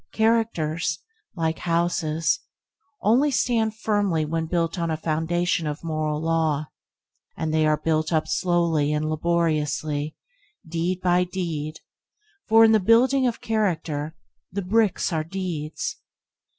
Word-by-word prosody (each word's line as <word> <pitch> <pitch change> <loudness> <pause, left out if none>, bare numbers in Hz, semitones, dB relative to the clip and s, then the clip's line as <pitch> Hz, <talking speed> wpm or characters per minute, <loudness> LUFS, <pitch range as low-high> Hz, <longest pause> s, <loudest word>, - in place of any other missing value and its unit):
Characters, 175 -9 +1 0.4
like 160 -2 -1
houses, 165 -2 0 0.6
only 245 +8 +4
stand 230 -5 +1
firmly 205 -7 0
when 160 +1 -2
built 170 +1 -1
on 170 -1 -1
a 160 - -1
foundation 160 +1 0
of 150 +2 -5
moral 155 -2 -1
law 160 -2 0 0.7
and 160 -1 -2
they 155 -1 +3
are 155 0 +3
built 155 +1 0
up 160 -1 +1
slowly 170 -5 +1
and 150 +1 -1
laboriously, 155 -2 0 0.5
deed 170 +3 -2
by 180 0 +3
deed, 165 -4 -4 0.7
for 225 +1 +7
in 220 - +5
the 220 - +5
building 250 +6 +4
of 235 - -3
character, 165 -8 -1 0.4
the 200 +2 -3
bricks 205 -1 +1
are 155 -1 0
deeds. 165 -3 -4
165 Hz, 125 wpm, -24 LUFS, 155-190 Hz, 0.7 s, for